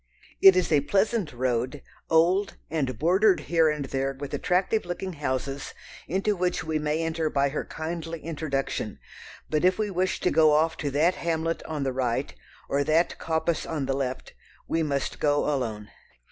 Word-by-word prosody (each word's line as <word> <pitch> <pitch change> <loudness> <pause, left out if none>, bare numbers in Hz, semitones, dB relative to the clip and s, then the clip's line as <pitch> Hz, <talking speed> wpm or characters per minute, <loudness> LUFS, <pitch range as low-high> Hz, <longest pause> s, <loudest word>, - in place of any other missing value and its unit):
It 195 -1 +9
is 180 -2 +1
a 150 -2 +5
pleasant 195 +2 +1
road, 125 +2 -1 0.3
old, 180 +5 +3
and 135 -7 -1
bordered 185 - +3
here 165 -2 +3
and 150 -2 -2
there 135 +1 -2
with 145 -1 -6
attractive 195 +4 +1
looking 175 +1 -4
houses 135 -1 -3 0.3
into 195 +5 0
which 180 -1 -1
we 160 -1 -1
may 150 +2 -1
enter 165 -1 -1
by 140 -1 +1
her 145 - -3
kindly 165 0 -5
introduction, 145 -8 -3 0.5
but 155 +1 0
if 185 0 +4
we 215 -2 -1
wish 185 0 0
to - - +2
go 155 -2 +5
off 160 +2 +3
to 145 - -2
that 155 +6 +3
hamlet 165 -1 -2
on 150 -3 -3
the 135 -1 -1
right, 125 -2 -1 0.3
or 140 +1 +1
that 160 +4 +1
coppice 160 0 0
on 150 -4 -2
the 135 - 0
left, 130 -1 -3 0.3
we 165 - 0
must 140 -3 -2
go 145 -1 +2
alone. 115 -8 -2
155 Hz, 175 wpm, -26 LUFS, 140-175 Hz, 0.5 s, It